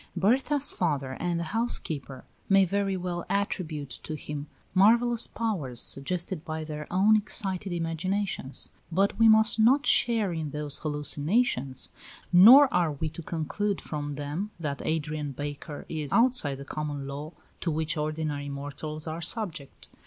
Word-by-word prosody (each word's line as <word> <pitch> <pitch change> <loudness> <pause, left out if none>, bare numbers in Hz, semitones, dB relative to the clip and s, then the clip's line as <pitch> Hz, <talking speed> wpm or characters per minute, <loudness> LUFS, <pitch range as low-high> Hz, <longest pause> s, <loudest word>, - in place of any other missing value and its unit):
Berta's 265 - +2
father 145 -7 -1
and 175 -1 -1
the - - -2
housekeeper 155 - -1 0.2
may 195 -1 +5
very 195 +1 -1
well 175 -1 -4
attribute 160 -8 -2
to 155 - -5
him 150 -1 -6 0.3
marvellous 230 +5 +4
powers, 170 - -3
suggested 175 +3 -2
by 160 -2 -4
their 150 -1 -6
own 200 +4 +4
excited 195 -2 0
imaginations; 170 -2 -2 0.2
but 195 +5 +1
we 225 -1 +7
must 220 +1 +5
not 265 +6 +4
share 225 -6 +4
in 160 -2 -3
those 150 0 -4
hallucinations, 150 - 0 0.4
nor 240 +11 +9
are 170 -4 +2
we 155 +2 -3
to 160 +2 -8
conclude 175 +6 -2
from 145 -1 -5
them 150 +8 -4
that 145 -4 -4
Adrian 150 -2 -2
Baker 145 +1 -6
is 150 -4 -3
outside 235 - +4
the 140 - -9
common 145 -2 -4
law 145 +4 -7 0.3
to 175 - -2
which 160 +1 -1
ordinary 150 -2 -3
mortals 145 +2 -6
are 160 +1 -5
subject. 170 - -4
165 Hz, 145 wpm, -27 LUFS, 150-200 Hz, 0.4 s, nor